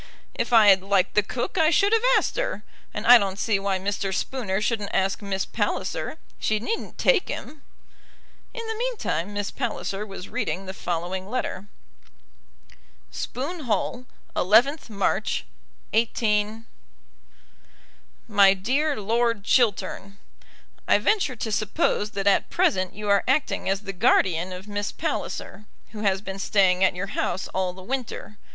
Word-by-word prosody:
"If - - -2
I 220 -3 +7
had 190 -1 +6
liked 195 -1 +1
the 210 - +4
cook 245 - -3
I 315 -1 +5
should 400 +6 +3
have 450 - +4 0.2
asked - - -1
her, - - -2 0.3
and 210 - -5
I 245 0 +9
don't 195 -2 -2
see 215 -2 +1
why 195 -1 0
Mr. 195 0 -2
Spooner 195 -1 -2
shouldn't 210 -1 -1
ask 190 +2 +1
Miss 195 -1 -2
Palliser. - - -2 0.2
She 215 - +1
needn't 445 - -4
take 460 -7 +3
him." 300 -1 -7 0.9
In 465 -2 -6
the 445 - -2
meantime 445 - -2
Miss 205 -1 -3
Palliser 215 -5 -3
was 195 -2 -8
reading 215 -5 -3
the 190 - -6
following 180 +2 -3
letter: 210 -5 -3 1.4
Spoon 300 +4 -5
Hall, 245 +3 -1 0.3
11th 240 - +3
March, 200 - -1 0.5
18. 220 -1 +1 1.6
MY 200 -3 +6
DEAR 270 +8 0
LORD 230 +1 0
CHILTERN, 200 -4 +1 0.7
I - - +5
venture 385 -12 +1
to 225 -1 -4
suppose 210 0 0
that 195 -1 -3
at 200 - +3
present 185 -1 +1
you 210 0 -6
are 200 -1 +4
acting 265 -6 +1
as 195 +1 0
the 195 -2 -6
guardian 180 -1 +2
of 185 +2 -8
Miss 205 0 -3
Palliser, 210 +2 -4 0.3
who 215 - -8
has 195 -2 +1
been 195 -1 -6
staying 190 -2 +3
at 190 - +3
your 180 +2 -3
house 190 - -2
all 185 -1 -1
the 185 +1 -12
winter. 235 -3 -5
205 Hz, 150 wpm, -25 LUFS, 195-240 Hz, 1.6 s, I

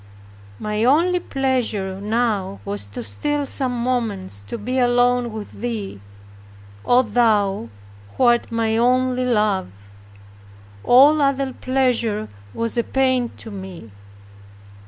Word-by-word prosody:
My 210 - -2
only 335 +8 +3
pleasure 230 - -2
now 210 - -1
was 100 0 -5
to 100 +4 -7
steal 285 - -2
some 250 -3 -2
moments 210 - -2
to - - -4
be 250 +5 -2
alone 245 -1 +2
with 215 -1 -7
Thee, 215 - -5 0.8
O 245 +1 +4
thou 210 - +1 0.5
who - - +1
art 240 -1 +3
my 225 -1 0
only 255 +1 +2
Love! 190 - -1 0.9
All 285 +5 +6
other 275 -1 +1
pleasure 245 -5 0 0.2
was 230 - -2
a - - +2
pain 260 -2 +1
to 225 - -9
me. 190 - -9
235 Hz, 115 wpm, -21 LUFS, 205-255 Hz, 0.9 s, All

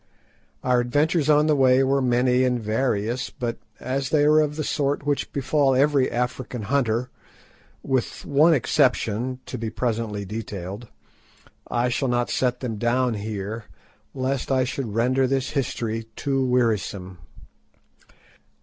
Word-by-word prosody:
Our 125 -1 +3
adventures 145 +5 +1
on 150 0 +5
the 155 -1 +3
way 130 -1 +4
were 135 +1 +2
many 125 0 +2
and 125 -1 +1
various, 115 +1 -1
but 120 -1 -4 0.2
as 135 +2 -2
they 150 -2 +3
are 150 +1 +5
of 150 -1 +1
the 155 - -2
sort 140 0 -1
which 145 -1 -1
befall 140 -1 +1
every 140 0 +3
African 125 -1 -3
hunter—with 125 +2 -3
one 155 +4 +4
exception 125 -2 +1
to 125 - -6
be 115 -1 -3
presently 110 -4 -2
detailed—I 105 +4 -6
shall 135 +3 0
not 120 0 0
set 125 -1 0
them 115 -4 -3
down 120 +2 +1
here, 105 +1 -5 0.5
lest 130 0 -2
I 130 -1 +3
should 125 -4 -4
render 130 +3 +2
this 135 0 -1
history 115 -4 -2
too 135 -2 0
wearisome. 105 -7 0
125 Hz, 130 wpm, -24 LUFS, 115-135 Hz, 0.5 s, on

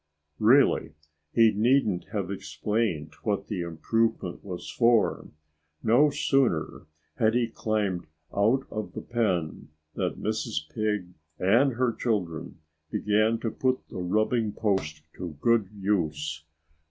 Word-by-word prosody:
Really, 130 +6 +4 0.4
he 115 -1 +5
needn't 110 -3 +2
have 100 -3 -3
explained 85 -2 -2
what 100 -2 -1
the 100 -4 -2
improvement 85 +3 -1
was 90 -3 -6
for. 115 -1 +2 0.6
No 125 +7 +5
sooner 130 - 0 0.3
had 110 -2 +3
he 120 -1 +2
climbed 105 -6 -2 0.3
out 115 +7 +3
of 110 -1 -5
the - - -5
pen 90 -12 -1 0.3
than - - -2
Mrs. 75 - -2
Pig 105 -5 -1 0.3
and 120 +9 +3
her 120 0 +1
children 95 -11 -2 0.3
began 110 +5 +2
to 115 - -1
put 130 0 -1
the - - -6
rubbing 110 +4 +1
post 80 -8 -1
to 85 -5 -6
good 115 0 +2
use. 80 -6 -1
105 Hz, 120 wpm, -27 LUFS, 90-115 Hz, 0.6 s, he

